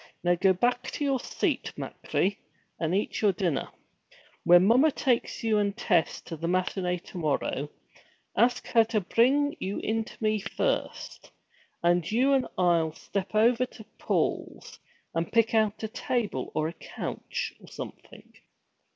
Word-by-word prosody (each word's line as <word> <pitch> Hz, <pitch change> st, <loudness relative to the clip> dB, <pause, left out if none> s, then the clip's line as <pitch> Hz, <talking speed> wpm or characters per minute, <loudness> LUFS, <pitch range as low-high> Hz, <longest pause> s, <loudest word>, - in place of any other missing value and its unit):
'Now 175 Hz, 0 st, +4 dB
go 190 Hz, +2 st, +3 dB
back 245 Hz, +7 st, 0 dB
to -, -, -3 dB
your 270 Hz, -2 st, +1 dB
seat, -, -, -2 dB
machree, 195 Hz, +1 st, -2 dB, 0.4 s
and 165 Hz, +2 st, 0 dB
eat 205 Hz, -, -1 dB
your 210 Hz, -2 st, +5 dB
dinner. 175 Hz, -5 st, -1 dB, 0.7 s
When 175 Hz, +1 st, +7 dB
mommer 255 Hz, +9 st, +5 dB
takes 250 Hz, -5 st, 0 dB
you 220 Hz, -2 st, +3 dB
and 200 Hz, +1 st, 0 dB
Tess 180 Hz, -8 st, +1 dB
to 165 Hz, -, -7 dB
the 165 Hz, +2 st, -4 dB
matinée 180 Hz, 0 st, -1 dB
to 180 Hz, -, -8 dB
morrow, 145 Hz, -2 st, -1 dB, 0.7 s
ask 245 Hz, +1 st, +2 dB
her 230 Hz, -2 st, +5 dB
to 220 Hz, -2 st, 0 dB
bring 275 Hz, -, +2 dB
you 195 Hz, +2 st, -3 dB
in 225 Hz, +1 st, -1 dB
to -, -, -13 dB
me 215 Hz, -1 st, +1 dB
first, 220 Hz, -, -3 dB, 0.5 s
and 175 Hz, 0 st, +2 dB
you 260 Hz, +5 st, +3 dB
and 265 Hz, -2 st, +2 dB
I'll 170 Hz, -3 st, +2 dB
step 200 Hz, +4 st, -4 dB
over 235 Hz, +3 st, +4 dB
to 225 Hz, -, -13 dB, 0.2 s
Paul's, -, -, -2 dB, 0.3 s
and 165 Hz, 0 st, -2 dB
pick 230 Hz, 0 st, +3 dB
out 220 Hz, -1 st, +2 dB
a -, -, 0 dB
table 220 Hz, -, -2 dB
or 155 Hz, -, +1 dB
a 165 Hz, -, -5 dB
couch, -, -, -5 dB
or -, -, -15 dB
something. -, -, -10 dB
205 Hz, 155 wpm, -28 LUFS, 175-235 Hz, 0.7 s, When